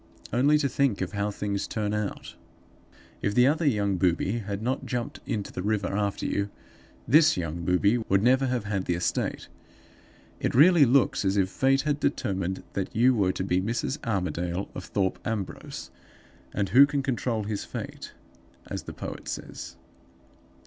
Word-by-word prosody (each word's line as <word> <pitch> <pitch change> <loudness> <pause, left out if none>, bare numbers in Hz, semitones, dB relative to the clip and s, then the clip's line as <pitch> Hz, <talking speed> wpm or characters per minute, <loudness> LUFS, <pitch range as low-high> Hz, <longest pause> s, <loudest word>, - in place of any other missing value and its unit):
Only 140 +5 +4
to 145 -2 +1
think 135 -4 +1
of 90 - -2
how 100 0 -1
things 100 -1 -3
turn 105 -1 -2
out! 105 -1 -4 0.9
If 100 +1 -1
the 125 - +6
other 155 +3 +2
young 100 -6 +1
booby 90 +5 +1
had 100 -1 -5
not 130 +3 -1
jumped 125 -2 -3
into 105 -3 -3
the - - -5
river 105 -1 -1
after 100 -1 -1
you, 100 0 -1 0.6
this 155 - +5
young 85 -1 -3
booby 100 +6 +3
would 100 -3 +1
never 130 +2 +4
have 125 -3 -1
had 100 -2 -2
the 85 - 0
estate. 90 - -2 0.9
It - - -1
really 160 +2 +7
looks 135 +1 +3
as 95 +1 +1
if 95 -1 +2
fate 135 +5 +2
had 150 0 -1
determined 95 - -1
that 95 - -3
you 125 +4 +5
were 100 -6 +2
to 95 - -3
be 90 -1 +1
Mrs. 115 +7 -2
Armadale, 90 -3 -2
of - - -7
Thorpe 95 -2 -1
Ambrose; 110 -5 -5 0.6
and 100 -2 -1
who 135 +7 +8
can 140 -1 -1
control 120 -4 -1
his 105 -1 -3
fate, - - -7 0.5
as - - -5
the - - -7
poet - - -7
says? - - -6
105 Hz, 170 wpm, -27 LUFS, 95-130 Hz, 0.9 s, who